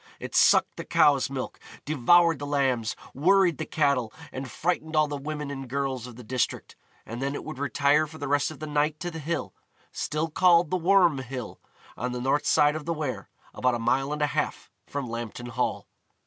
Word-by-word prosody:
It -, -, -7 dB
sucked -, -, +4 dB
the -, -, -5 dB
cows' 140 Hz, -4 st, +3 dB
milk, 135 Hz, -2 st, -5 dB, 0.3 s
devoured 165 Hz, +3 st, +4 dB
the 145 Hz, -, -5 dB
lambs, 130 Hz, -6 st, 0 dB, 0.2 s
worried 180 Hz, +2 st, +3 dB
the 160 Hz, -, -4 dB
cattle, 140 Hz, -7 st, +1 dB, 0.2 s
and 130 Hz, 0 st, -6 dB
frightened 160 Hz, 0 st, -2 dB
all 155 Hz, -1 st, +4 dB
the 145 Hz, -, -4 dB
women 150 Hz, 0 st, -5 dB
and 135 Hz, -2 st, -7 dB
girls 135 Hz, -2 st, -2 dB
of 120 Hz, -, -11 dB
the 125 Hz, -, -11 dB
district, 125 Hz, +2 st, -2 dB, 0.3 s
and 115 Hz, +3 st, -6 dB
then 140 Hz, +1 st, -1 dB
it -, -, -5 dB
would 155 Hz, -4 st, -7 dB
retire 145 Hz, +3 st, +2 dB
for 160 Hz, +1 st, -12 dB
the 145 Hz, -, -5 dB
rest 145 Hz, +1 st, +2 dB
of 155 Hz, -, -9 dB
the 155 Hz, -, -6 dB
night 150 Hz, 0 st, 0 dB
to 175 Hz, -, -3 dB
the 165 Hz, -, -6 dB
hill, 160 Hz, +3 st, -3 dB, 0.4 s
still 155 Hz, +2 st, -2 dB
called 170 Hz, -1 st, +4 dB
the -, -, +2 dB
Worm 175 Hz, -4 st, +4 dB
Hill, 130 Hz, -3 st, -7 dB, 0.4 s
on 125 Hz, +1 st, -3 dB
the 125 Hz, -, -3 dB
north 135 Hz, +4 st, 0 dB
side 150 Hz, +1 st, +4 dB
of 155 Hz, -2 st, -5 dB
the 170 Hz, -, -1 dB
Wear, 150 Hz, -4 st, -4 dB, 0.2 s
about 125 Hz, -1 st, +1 dB
a -, -, -1 dB
mile 135 Hz, +4 st, 0 dB
and 150 Hz, 0 st, -1 dB
a 145 Hz, -3 st, 0 dB
half -, -, -2 dB, 0.2 s
from 140 Hz, -3 st, -4 dB
Lambton 120 Hz, +1 st, -6 dB
Hall. 125 Hz, +1 st, -2 dB
145 Hz, 205 wpm, -26 LUFS, 130-155 Hz, 0.4 s, sucked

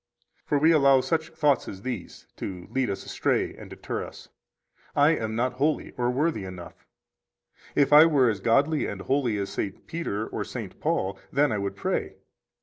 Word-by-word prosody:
15 -, -, -39 dB
For 145 Hz, -, +2 dB
we 155 Hz, +3 st, +5 dB
allow 140 Hz, -4 st, +5 dB
such 160 Hz, +4 st, -1 dB
thoughts 150 Hz, -4 st, +1 dB
as 95 Hz, 0 st, -8 dB
these 125 Hz, -8 st, -6 dB
to 90 Hz, -2 st, -6 dB
lead 130 Hz, -3 st, 0 dB
us 100 Hz, -, -4 dB
astray -, -, 0 dB
and -, -, -11 dB
deter -, -, -5 dB
us: -, -, -11 dB, 0.7 s
I 145 Hz, +2 st, +5 dB
am 110 Hz, -8 st, -2 dB
not 125 Hz, +2 st, 0 dB
holy 145 Hz, +4 st, 0 dB
or 120 Hz, -1 st, -1 dB
worthy 135 Hz, -3 st, 0 dB
enough; 90 Hz, -2 st, -10 dB, 0.9 s
if 145 Hz, 0 st, +3 dB
I 155 Hz, +2 st, +9 dB
were 140 Hz, -6 st, +4 dB
as 105 Hz, -4 st, 0 dB
godly 140 Hz, +9 st, +2 dB
and 100 Hz, -2 st, -5 dB
holy 130 Hz, -5 st, +1 dB
as 100 Hz, -1 st, -3 dB
St. 95 Hz, -, -4 dB
Peter 160 Hz, -11 st, -3 dB
or -, -, -4 dB
St. -, -, -7 dB
Paul, 95 Hz, +1 st, -1 dB
then 145 Hz, 0 st, +2 dB
I 105 Hz, -, -1 dB
would 100 Hz, 0 st, -3 dB
pray. -, -, -2 dB
130 Hz, 185 wpm, -26 LUFS, 100-150 Hz, 0.9 s, I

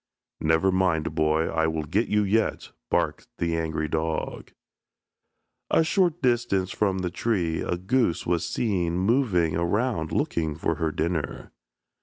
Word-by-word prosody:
"Never 80 Hz, +4 st, +2 dB
mind, 80 Hz, -4 st, +1 dB
boy, 80 Hz, +1 st, +2 dB
I 80 Hz, 0 st, +1 dB
will 80 Hz, -1 st, -2 dB
get 100 Hz, +10 st, 0 dB
you 105 Hz, 0 st, +2 dB
yet," 110 Hz, +3 st, 0 dB, 0.2 s
barked -, -, 0 dB
the 85 Hz, -1 st, 0 dB
angry 80 Hz, -1 st, -1 dB
dog. 80 Hz, +1 st, -3 dB, 1.2 s
A -, -, +4 dB
short 175 Hz, -2 st, +1 dB
distance 120 Hz, -7 st, +1 dB
from 100 Hz, -3 st, 0 dB
the 90 Hz, -2 st, -2 dB
tree 90 Hz, -6 st, -1 dB
a 90 Hz, -, -1 dB
goose 95 Hz, 0 st, 0 dB
was 85 Hz, -1 st, +1 dB
seen 90 Hz, -7 st, 0 dB
moving 95 Hz, -, +2 dB
around 85 Hz, 0 st, 0 dB
looking 80 Hz, -2 st, -1 dB
for 80 Hz, 0 st, -1 dB
her 80 Hz, -1 st, +1 dB
dinner. 80 Hz, -2 st, -3 dB
85 Hz, 140 wpm, -26 LUFS, 80-105 Hz, 1.2 s, A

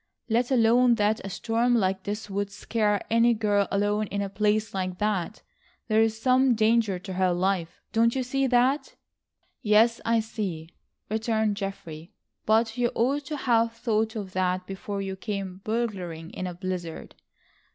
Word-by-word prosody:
Let 235 Hz, +2 st, +1 dB
alone 240 Hz, -1 st, +4 dB
that 210 Hz, 0 st, +1 dB
a 195 Hz, -, -5 dB
storm 230 Hz, +5 st, +1 dB
like 190 Hz, -3 st, +1 dB
this 210 Hz, +1 st, -4 dB
would 200 Hz, 0 st, -2 dB
scare 210 Hz, 0 st, -1 dB
any 230 Hz, +1 st, +4 dB
girl 205 Hz, -2 st, +1 dB
alone 205 Hz, +1 st, 0 dB
in 200 Hz, +1 st, -2 dB
a 200 Hz, -, -4 dB
place 210 Hz, +2 st, 0 dB
like 185 Hz, -1 st, -3 dB
that, 210 Hz, -1 st, -2 dB, 0.5 s
there 215 Hz, 0 st, +4 dB
is 220 Hz, -1 st, +1 dB
some 255 Hz, +1 st, +3 dB
danger 220 Hz, -3 st, +2 dB
to 190 Hz, +1 st, -7 dB
her 185 Hz, 0 st, +2 dB
life. 180 Hz, -1 st, -1 dB
Don't 230 Hz, +1 st, +3 dB
you 260 Hz, -, 0 dB
see 270 Hz, +2 st, 0 dB
that?" 260 Hz, -, +2 dB, 0.7 s
"Yes, 225 Hz, +2 st, +4 dB
I 230 Hz, 0 st, +2 dB
see," 200 Hz, -8 st, -4 dB, 0.4 s
returned 220 Hz, -1 st, 0 dB
Geoffrey, 195 Hz, -3 st, -7 dB, 0.3 s
"but 225 Hz, +2 st, +2 dB
you 240 Hz, -1 st, +2 dB
ought 275 Hz, +5 st, +1 dB
to 300 Hz, +2 st, -4 dB
have 230 Hz, -3 st, +2 dB
thought 225 Hz, -1 st, -1 dB
of 200 Hz, -4 st, -6 dB
that 185 Hz, 0 st, 0 dB
before 195 Hz, +1 st, -5 dB
you 190 Hz, 0 st, -4 dB
came 195 Hz, -2 st, -5 dB
burgling 190 Hz, -8 st, -3 dB
in 185 Hz, -, -4 dB
a 180 Hz, -, -6 dB
blizzard." 180 Hz, -3 st, -5 dB
215 Hz, 160 wpm, -26 LUFS, 195-230 Hz, 0.7 s, alone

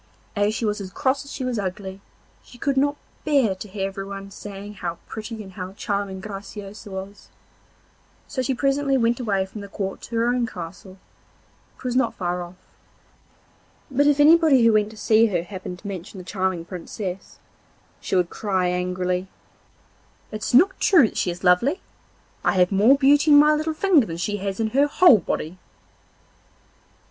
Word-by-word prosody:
As 205 Hz, +1 st, +1 dB
she 230 Hz, -, -2 dB
was 210 Hz, 0 st, -1 dB
as 190 Hz, -, -6 dB
cross 265 Hz, +6 st, 0 dB
as 280 Hz, -, -10 dB
she 265 Hz, -, -5 dB
was 245 Hz, -3 st, -1 dB
ugly, 190 Hz, 0 st, -5 dB, 0.4 s
she 245 Hz, -, -16 dB
could 275 Hz, +3 st, -1 dB
not 285 Hz, +2 st, +2 dB, 0.3 s
bear 275 Hz, -9 st, +2 dB
to 190 Hz, +3 st, -9 dB
hear 195 Hz, 0 st, -3 dB
everyone 195 Hz, 0 st, -7 dB
saying 205 Hz, +1 st, -9 dB
how 170 Hz, -1 st, -3 dB
pretty 220 Hz, 0 st, -7 dB
and 190 Hz, -, -12 dB
how 185 Hz, 0 st, -7 dB
charming 200 Hz, -1 st, -3 dB
Graciosa 205 Hz, +1 st, -8 dB
was; 195 Hz, +1 st, -8 dB, 1.0 s
so 260 Hz, -, -3 dB
she 255 Hz, +1 st, -1 dB
presently 275 Hz, +1 st, +1 dB
went 235 Hz, 0 st, +1 dB
away 200 Hz, -6 st, 0 dB
from 205 Hz, +2 st, -9 dB
the 200 Hz, -, -8 dB
court 195 Hz, -1 st, -5 dB
to 235 Hz, -, -7 dB
her 230 Hz, 0 st, +2 dB
own 245 Hz, -1 st, +1 dB
castle, 185 Hz, +1 st, -9 dB, 0.8 s
which -, -, -17 dB
was 250 Hz, -1 st, -2 dB
not 255 Hz, -3 st, +1 dB
far 180 Hz, -1 st, -2 dB
off. 175 Hz, +1 st, -9 dB, 1.4 s
But 285 Hz, +2 st, +3 dB
if 290 Hz, -1 st, +3 dB
anybody 305 Hz, -4 st, +6 dB
who 230 Hz, -, +5 dB
went 210 Hz, -1 st, +2 dB
to 220 Hz, -, -14 dB
see 220 Hz, +2 st, +4 dB
her 175 Hz, -5 st, -1 dB
happened 185 Hz, -1 st, -7 dB
to 200 Hz, -, -10 dB
mention 190 Hz, 0 st, -7 dB
the 185 Hz, -, -8 dB
charming 185 Hz, -2 st, -2 dB
Princess, 185 Hz, +2 st, -7 dB, 0.6 s
she -, -, -3 dB
would 180 Hz, -2 st, +1 dB
cry 190 Hz, -4 st, 0 dB
angrily: 180 Hz, +1 st, -1 dB, 1.0 s
'It's 215 Hz, 0 st, -4 dB
not 370 Hz, +9 st, +5 dB
true 320 Hz, -, +5 dB
that -, -, -11 dB
she -, -, 0 dB
is 175 Hz, +2 st, -6 dB
lovely. 215 Hz, -, +3 dB, 0.6 s
I -, -, +2 dB
have 180 Hz, -1 st, +3 dB
more 215 Hz, +8 st, +5 dB
beauty 290 Hz, +2 st, +4 dB
in 290 Hz, -, +8 dB
my 300 Hz, +1 st, +6 dB
little 310 Hz, +1 st, -1 dB
finger 325 Hz, -, +3 dB
than 165 Hz, -1 st, -5 dB
she 205 Hz, +4 st, -2 dB
has 195 Hz, 0 st, -4 dB
in 220 Hz, -1 st, 0 dB
her 280 Hz, +4 st, +3 dB
whole 290 Hz, -, +6 dB
body. 180 Hz, 0 st, -4 dB
205 Hz, 180 wpm, -23 LUFS, 190-255 Hz, 1.4 s, in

